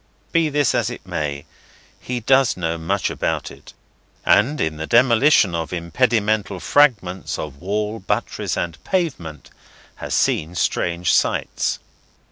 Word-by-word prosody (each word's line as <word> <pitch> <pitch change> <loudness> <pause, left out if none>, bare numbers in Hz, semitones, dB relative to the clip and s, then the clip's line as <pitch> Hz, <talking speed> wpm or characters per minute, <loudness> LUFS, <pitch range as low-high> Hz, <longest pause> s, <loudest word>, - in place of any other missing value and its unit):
Be 165 -2 +2
this 145 -3 +1
as - - 0
it - - -9
may, 70 -1 -4 0.5
he 125 -1 -4
does 130 0 +3
know 85 -2 -1
much 95 +5 -1
about - - -2
it, - - -14 0.5
and, 150 +4 +3
in 80 -1 -1
the 80 +1 -5
demolition 120 - +4
of 80 -1 -3
impedimental 105 +2 0
fragments 100 -12 +2
of 70 -3 -7
wall, 105 +3 -2
buttress, 95 - -2
and 85 -2 -4
pavement, 90 - -3 0.5
has - - -3
seen 80 +3 0
strange 85 +1 0
sights. - - 0
100 Hz, 130 wpm, -21 LUFS, 85-125 Hz, 0.5 s, demolition